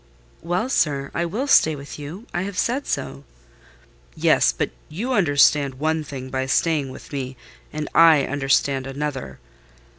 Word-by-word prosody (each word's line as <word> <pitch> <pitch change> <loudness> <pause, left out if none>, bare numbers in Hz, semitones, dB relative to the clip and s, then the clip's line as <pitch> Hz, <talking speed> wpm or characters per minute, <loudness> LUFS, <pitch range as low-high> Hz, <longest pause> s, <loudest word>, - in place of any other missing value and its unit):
"Well, 175 +7 -1
sir, 140 - 0
I 170 - -1
will 220 +11 -2
stay 160 - +4
with 140 +1 -9
you: 160 +10 -8
I 175 - -1
have 190 0 -5
said 260 +4 0
so." 70 - -3 0.9
"Yes—but - - +2 0.2
you 225 +12 -3
understand 145 - +3
one 155 +3 -1
thing 130 -3 -8
by 130 0 -2
staying 150 0 +1
with 130 - -12
me; 130 -2 -4 0.3
and 150 0 -4
I 160 -4 +6
understand 135 -1 0
another. 140 -1 -5
145 Hz, 145 wpm, -22 LUFS, 135-170 Hz, 0.9 s, I